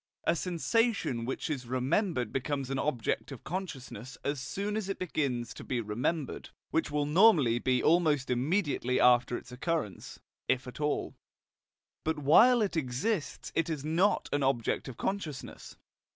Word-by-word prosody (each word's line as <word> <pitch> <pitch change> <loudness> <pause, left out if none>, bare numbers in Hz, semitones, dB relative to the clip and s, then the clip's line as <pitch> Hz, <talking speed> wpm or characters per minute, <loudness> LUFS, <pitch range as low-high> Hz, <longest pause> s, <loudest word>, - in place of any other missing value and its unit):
A - - +2
sensation 180 - 0
which 130 - -3
is 135 -6 -3
remembered 130 - 0
becomes 135 0 -2
an 135 - -1
object 135 -1 -1
of 135 - -9
consciousness 135 - -6
as 145 0 -1
soon 200 +10 -3
as 215 -3 -2
it 195 - -2
begins 135 -9 -2
to - - -10
be 125 - -2
remembered, 125 +8 -2 0.2
which 160 - +1
will 145 0 0
normally 150 - +5
be 125 0 +1
almost 155 -5 +3
immediately 135 -1 +1
after 120 0 +4
its 125 - -12
occurrence 130 - -3 0.3
(if 130 0 +1
at 125 +4 -8
all); 150 0 -1 0.9
but 160 0 0
while 220 - +6
it 200 - -2
exists 155 - -2
it 165 0 0
is 150 -3 -3
not 175 +6 +2
an 145 - +1
object 135 -4 0
of 130 - -8
consciousness. 180 -8 -4
145 Hz, 150 wpm, -30 LUFS, 125-170 Hz, 0.9 s, while